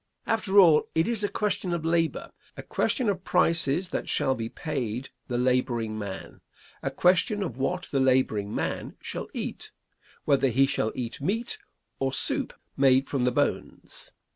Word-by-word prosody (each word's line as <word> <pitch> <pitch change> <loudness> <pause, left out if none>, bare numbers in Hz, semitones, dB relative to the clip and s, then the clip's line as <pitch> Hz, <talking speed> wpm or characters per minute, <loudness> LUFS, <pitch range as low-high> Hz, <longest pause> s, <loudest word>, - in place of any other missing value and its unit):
After 215 -3 0
all, 165 -5 +6
it 160 +1 +2
is 230 -3 0
a 205 - +1
question 200 -4 -1
of 165 -2 -3
labor; 165 -1 0 0.3
a - - -7
question 255 - 0
of 190 -3 -1
prices 170 -1 +2
that - - -3
shall 135 - +2
be 115 -3 -4
paid 130 -5 -4 0.2
the 120 - -2
laboring 120 -3 0
man; 100 -3 -7 0.4
a - - -1
question 190 +4 +2
of 130 -10 -5
what 135 - -1
the 135 - +1
laboring 130 -6 +2
man - - -3
shall - - -5
eat; - - -4 0.6
whether 140 -1 +3
he 135 +2 +4
shall 135 -5 -1
eat 120 +1 -5
meat 225 - -1 0.4
or 135 0 0
soup - - 0 0.2
made 135 0 +4
from 130 -3 0
the 125 - +3
bones. - - -3
135 Hz, 165 wpm, -27 LUFS, 125-180 Hz, 0.6 s, all